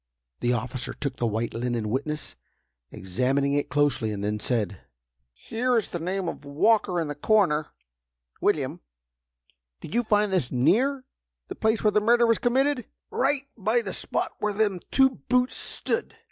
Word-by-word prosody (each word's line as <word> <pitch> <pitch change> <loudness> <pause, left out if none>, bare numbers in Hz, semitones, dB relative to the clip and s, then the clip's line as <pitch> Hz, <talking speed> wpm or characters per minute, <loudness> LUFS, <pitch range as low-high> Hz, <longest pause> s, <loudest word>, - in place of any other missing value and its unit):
The 120 - +1
officer 125 +1 -3
took 140 -3 -4
the 120 - 0
white 110 +2 -2
linen 115 -2 -2
witness, 150 +4 -2 0.5
examining 130 +9 0
it 145 0 0
closely, 145 -7 +1
and 100 -1 -4
then 105 +1 -1
said: 105 -4 -1 0.5
"Here 240 - -1
is 220 - 0
the 175 - -4
name 185 +2 -2
of 165 - -5
'Walker,' 180 +6 +2
in 165 - -1
the 145 - -3
corner. 155 -2 +2 0.7
William, - - 0 1.0
did - - -9
you 240 - +3
find 210 -3 +2
this 170 -10 0
near 255 - +2 0.4
the - - -5
place 220 +1 +1
where 210 - +4
the 210 - +3
murder 235 +2 +4
was 230 -2 +3
committed?" 260 0 +1 0.3
"Right 275 +1 +1
by 225 +3 +1
the - - -4
spot - - -2
where 210 0 0
them 205 -3 +1
two 265 -1 +5 0.2
boots 250 0 +2
stood!" 465 - -2
180 Hz, 160 wpm, -26 LUFS, -, 1.0 s, two